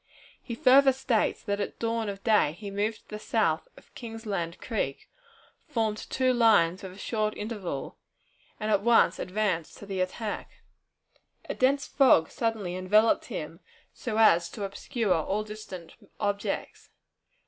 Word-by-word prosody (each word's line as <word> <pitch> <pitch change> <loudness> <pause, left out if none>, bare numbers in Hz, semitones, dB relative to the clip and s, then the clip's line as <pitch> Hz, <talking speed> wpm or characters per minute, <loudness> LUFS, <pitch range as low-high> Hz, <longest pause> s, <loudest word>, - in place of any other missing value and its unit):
He 235 - -6
further 270 +3 +6
states 255 -4 0
that 200 0 -2
at 200 - -4
dawn 230 -2 -1
of 195 0 -7
day 210 -9 +3
he 200 +3 -8
moved 210 +2 -2
to - - -38
the 210 - -6
south 190 -8 0
of - - -19
Kingsland 210 -8 -5
Creek, 200 - -3 0.6
formed 225 -7 -1
two 255 -1 +2
lines 205 -7 +4
with 190 -1 -8
a - - -14
short 215 0 -2
interval, 205 - -5 0.6
and 215 0 -1
at 200 -2 +3
once 235 +2 +4
advanced 185 -4 -2
to - - -10
the 195 -2 -3
attack. 205 +4 -4 0.8
A - - -2
dense 275 +2 +2
fog 255 - +4
suddenly 220 -6 -2
enveloped 210 +5 +3
him, - - -6 0.3
so 220 -3 -4
as 175 -6 +5
to 205 - -7
obscure 205 +2 -1
all 195 +6 -1
distant 210 -5 -9 0.3
objects. 205 0 -3
210 Hz, 150 wpm, -28 LUFS, 190-230 Hz, 0.8 s, further